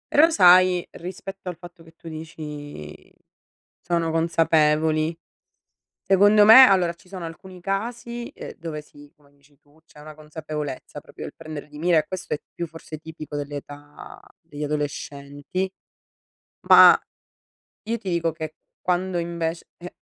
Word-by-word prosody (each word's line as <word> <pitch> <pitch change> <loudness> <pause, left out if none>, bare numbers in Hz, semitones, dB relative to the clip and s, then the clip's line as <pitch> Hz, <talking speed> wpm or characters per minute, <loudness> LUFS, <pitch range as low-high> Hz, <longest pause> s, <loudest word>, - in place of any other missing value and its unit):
Però 315 +3 +7
sai 180 - +5
rispetto 190 +1 -8
al 175 - -7
fatto 175 0 -14
che 165 0 -18
tu - - -14
dici: 150 - -9 0.7
"Sono 170 -1 -1
consapevoli." 160 -1 +2 0.9
Secondo 205 +2 +5
me, 255 +5 +10
allora, 180 -5 +2
ci 170 - -24
sono 180 -3 -7
alcuni 180 +3 -11
casi, 235 +5 -4
ehm, - - -9
dove 160 -2 -6
sì, 145 -1 -17
come 145 -2 -26
dici 140 0 -28
tu, 145 +2 -27
c'è 150 - -17
una 155 0 -11
consapevolezza, 150 -2 -7
proprio - - -10
il - - -9
prendere 155 -2 -8
di 150 - -12
mira 170 +1 +3
e 155 - 0
questo 185 -4 -4
è 150 - -7
più 170 - -4
forse 160 -1 -10
tipico 155 -1 -9
dell'età 145 0 -9 0.2
degli 150 -4 -7
adolescenti; 145 +3 -4 1.0
ma - - +10 0.9
io 230 +1 -1
ti 200 -4 -5
dico 170 -1 0
che 155 -1 -7 0.3
quando 180 0 -1
invec 170 -1 -3
e 175 +1 -10
165 Hz, 145 wpm, -23 LUFS, 150-180 Hz, 1.0 s, me